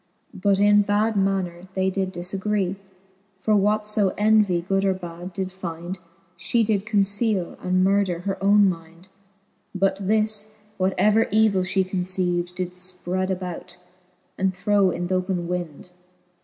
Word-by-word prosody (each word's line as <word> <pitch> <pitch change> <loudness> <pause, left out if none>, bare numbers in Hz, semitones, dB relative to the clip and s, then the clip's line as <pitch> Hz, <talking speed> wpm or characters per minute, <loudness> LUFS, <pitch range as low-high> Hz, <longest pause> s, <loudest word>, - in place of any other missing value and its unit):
But 195 +1 +1
in 205 0 +5
bad 210 +2 +1
maner 190 -2 -1
they 190 0 +1
did 190 0 -2
difagree; 190 +2 -2 0.7
For 215 - +3
what 210 +1 +2
fo 210 -2 +3
Envie 210 -4 +3
good 195 0 +1
or 190 -1 +2
bad 175 0 -8
did 185 +1 -3
fynd^ 175 -1 -6 0.4
She 175 +7 +1
did 210 -1 0
conceale, 205 -2 0
and 185 0 +2
murder 190 -3 +1
her 195 +1 -4
owne 205 0 +5
mynd: 170 +1 -6 0.7
But 195 +1 +1
this, 215 +1 -1 0.2
what 190 +1 +1
ever 215 +4 +4
evil 215 -2 +3
1 - - -2
fhe 190 +1 0
conceived. 180 -1 -2
Did 180 -1 -3
fpred 185 +1 -2
abroad, 180 -2 -5 0.6
and 190 -1 +1
throw 200 0 +2
in 175 0 -3
th*open 185 -1 -1
wynd. 175 -1 -5
190 Hz, 145 wpm, -23 LUFS, 180-205 Hz, 0.7 s, in